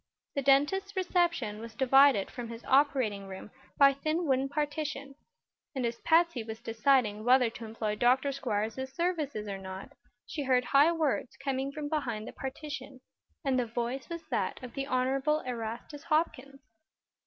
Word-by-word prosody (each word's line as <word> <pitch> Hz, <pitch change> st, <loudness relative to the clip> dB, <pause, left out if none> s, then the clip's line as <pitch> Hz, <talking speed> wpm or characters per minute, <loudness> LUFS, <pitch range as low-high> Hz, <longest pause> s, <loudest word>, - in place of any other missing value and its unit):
The 280 Hz, -, -1 dB
dentist's 295 Hz, +9 st, +2 dB
reception 345 Hz, -, 0 dB
room -, -, -9 dB
was 230 Hz, -1 st, -9 dB
divided 270 Hz, -4 st, +5 dB
from 240 Hz, -2 st, -6 dB
his 230 Hz, 0 st, -9 dB
operating 260 Hz, -8 st, +2 dB
room 190 Hz, +2 st, -9 dB, 0.3 s
by 280 Hz, -1 st, +7 dB
a -, -, -5 dB
thin 310 Hz, +5 st, -1 dB
wooden 270 Hz, -1 st, +1 dB
partition, 290 Hz, -1 st, -3 dB, 0.6 s
and 260 Hz, -2 st, -1 dB
as 235 Hz, 0 st, -3 dB
Patsy 335 Hz, -5 st, +3 dB
was 220 Hz, 0 st, -7 dB
deciding 225 Hz, -2 st, +1 dB
whether 250 Hz, -1 st, +4 dB
to 230 Hz, -, -8 dB
employ 220 Hz, -1 st, -3 dB
Dr. 255 Hz, +4 st, +3 dB
Squiers's 250 Hz, 0 st, -2 dB
services 300 Hz, -9 st, -2 dB
or 195 Hz, -1 st, -4 dB
not 190 Hz, 0 st, -8 dB, 0.3 s
she 300 Hz, -, -5 dB
heard 250 Hz, -1 st, +3 dB
high 280 Hz, +6 st, +5 dB
words 310 Hz, -6 st, -1 dB
coming 275 Hz, 0 st, -2 dB
from 295 Hz, 0 st, -5 dB
behind 235 Hz, -8 st, -2 dB
the -, -, -8 dB
partition, 275 Hz, -1 st, -7 dB, 0.4 s
and 265 Hz, -2 st, +2 dB
the 245 Hz, -, -1 dB
voice 240 Hz, +5 st, -3 dB
was 335 Hz, -1 st, -5 dB
that -, -, -1 dB
of 245 Hz, -, -8 dB
the 275 Hz, 0 st, -3 dB
Honorable 270 Hz, +4 st, +1 dB
Erastus 240 Hz, +5 st, -6 dB
Hopkins. 280 Hz, -4 st, -1 dB
265 Hz, 165 wpm, -30 LUFS, 230-290 Hz, 0.6 s, by